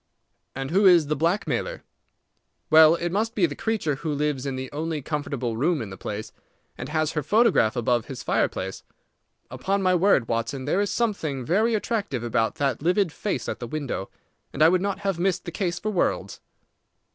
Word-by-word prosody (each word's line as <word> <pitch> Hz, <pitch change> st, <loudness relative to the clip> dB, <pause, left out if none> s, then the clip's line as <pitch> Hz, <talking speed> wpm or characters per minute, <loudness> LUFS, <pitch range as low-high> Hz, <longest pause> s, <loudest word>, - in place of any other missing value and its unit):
"And 135 Hz, +1 st, -4 dB
who 195 Hz, +3 st, +5 dB
is 175 Hz, -4 st, +6 dB
the 150 Hz, -, +1 dB
blackmailer?" 190 Hz, -, -1 dB, 0.9 s
"Well, 160 Hz, +1 st, +8 dB
it 170 Hz, 0 st, -3 dB
must 220 Hz, +4 st, -1 dB
be 190 Hz, -, +3 dB
the 150 Hz, -, -3 dB
creature 210 Hz, -11 st, -1 dB
who 155 Hz, +2 st, -3 dB
lives 145 Hz, -2 st, -1 dB
in 135 Hz, -, -2 dB
the 130 Hz, 0 st, -6 dB
only 155 Hz, 0 st, -3 dB
comfortable 140 Hz, -5 st, -3 dB
room 155 Hz, +5 st, +1 dB
in 105 Hz, -6 st, -6 dB
the -, -, -7 dB
place, 105 Hz, +3 st, -6 dB, 0.4 s
and 125 Hz, -, -7 dB
has 155 Hz, 0 st, 0 dB
her 155 Hz, -, -1 dB
photograph 205 Hz, -, +3 dB
above 120 Hz, -1 st, +1 dB
his 135 Hz, -, -7 dB
fireplace. -, -, -1 dB, 0.7 s
Upon 190 Hz, +11 st, -1 dB
my 185 Hz, 0 st, +3 dB
word, 180 Hz, -, +3 dB
Watson, 115 Hz, +3 st, -2 dB
there 180 Hz, +7 st, +1 dB
is 205 Hz, -, 0 dB
something 160 Hz, -, -1 dB
very 220 Hz, -, +2 dB
attractive 205 Hz, -, -2 dB
about 115 Hz, +2 st, 0 dB
that 140 Hz, -5 st, -1 dB
livid 180 Hz, +2 st, +2 dB
face 205 Hz, -, -3 dB
at -, -, -4 dB
the 120 Hz, -, -5 dB
window, 135 Hz, -8 st, -4 dB, 0.4 s
and 150 Hz, -, +1 dB
I 160 Hz, -, +8 dB
would 180 Hz, +1 st, +2 dB
not 200 Hz, 0 st, -2 dB
have 195 Hz, -4 st, -1 dB
missed 185 Hz, 0 st, 0 dB
the 170 Hz, -, -5 dB
case 175 Hz, +1 st, -2 dB
for 215 Hz, +4 st, -3 dB
worlds." 185 Hz, -, -1 dB
160 Hz, 190 wpm, -25 LUFS, 135-195 Hz, 0.9 s, Well